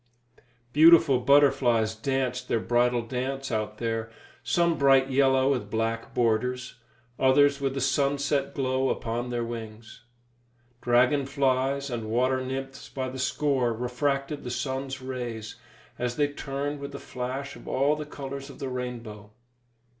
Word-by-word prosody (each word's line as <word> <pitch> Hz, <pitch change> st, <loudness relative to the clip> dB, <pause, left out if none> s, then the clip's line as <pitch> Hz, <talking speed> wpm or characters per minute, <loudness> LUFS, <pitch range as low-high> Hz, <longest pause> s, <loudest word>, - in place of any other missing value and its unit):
Beautiful 160 Hz, -3 st, +7 dB
butterflies 125 Hz, -4 st, +4 dB
danced 130 Hz, +2 st, -2 dB
their 115 Hz, -, +1 dB
bridal 120 Hz, +1 st, +1 dB
dance 130 Hz, +3 st, -4 dB
out 110 Hz, -1 st, -2 dB
there, 115 Hz, -1 st, -2 dB, 0.3 s
some 170 Hz, -1 st, +2 dB
bright 135 Hz, -2 st, +4 dB
yellow 135 Hz, 0 st, +3 dB
with 130 Hz, -3 st, -2 dB
black 115 Hz, 0 st, -2 dB
borders, 125 Hz, +2 st, 0 dB, 0.4 s
others 140 Hz, +1 st, +4 dB
with 135 Hz, -1 st, -1 dB
the 135 Hz, -, -2 dB
sunset 140 Hz, +1 st, 0 dB
glow 130 Hz, -1 st, 0 dB
upon 120 Hz, +1 st, -2 dB
their 120 Hz, -1 st, -2 dB
wings. 115 Hz, -1 st, -8 dB, 0.8 s
Dragon 125 Hz, +3 st, +3 dB
flies 135 Hz, 0 st, 0 dB
and 115 Hz, -2 st, -4 dB
water 130 Hz, +3 st, +1 dB
nymphs 135 Hz, +1 st, -6 dB
by 130 Hz, -1 st, -4 dB
the 130 Hz, +1 st, -7 dB
score 130 Hz, -2 st, +1 dB
refracted 135 Hz, +5 st, -2 dB
the 125 Hz, -, -5 dB
sun's 130 Hz, +2 st, -3 dB
rays 120 Hz, -4 st, -5 dB, 0.4 s
as 120 Hz, 0 st, -2 dB
they 145 Hz, -1 st, +1 dB
turned 145 Hz, 0 st, -4 dB
with 140 Hz, 0 st, -7 dB
a -, -, -6 dB
flash 130 Hz, +3 st, -5 dB
of -, -, -13 dB
all 140 Hz, +3 st, +2 dB
the 150 Hz, -, -5 dB
colours 140 Hz, -1 st, -7 dB
of 135 Hz, -, -11 dB
the 135 Hz, -, -4 dB
rainbow. 120 Hz, -5 st, -6 dB
130 Hz, 140 wpm, -27 LUFS, 120-140 Hz, 0.8 s, Beautiful